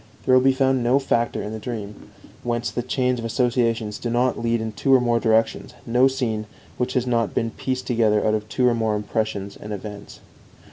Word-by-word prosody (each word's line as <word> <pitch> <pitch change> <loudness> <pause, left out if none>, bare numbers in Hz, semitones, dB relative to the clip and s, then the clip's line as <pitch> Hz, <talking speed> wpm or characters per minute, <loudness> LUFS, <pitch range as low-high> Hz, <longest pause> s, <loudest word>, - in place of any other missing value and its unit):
There 130 - +3
will 130 - +7
be 135 +1 +5
found 130 -1 +2
no 125 +3 +4
factor 120 -4 0
in 105 - -5
the 110 - -5
dream 105 -2 -7 0.3
whence 120 0 -2
the 120 - -2
chains 125 0 0
of 115 - -5
associations 115 -3 0
do 120 - -3
not 125 +2 +1
lead 115 0 +1
in 110 0 -3
two 135 +5 -1
or - - +6
more 120 -1 +2
directions, 115 +1 +1
no 125 +3 +4
scene 115 -5 -2 0.3
which 125 +1 -1
has 125 -1 +1
not 115 -3 0
been 115 0 0
pieced 130 +2 -3
together 110 -4 +2
out 110 - +2
of 105 0 -2
two 125 +1 +2
or 120 - +4
more 110 -2 0
impressions 105 -1 -3
and 105 - -9
events. 105 0 -8
115 Hz, 215 wpm, -23 LUFS, 110-125 Hz, 0.3 s, will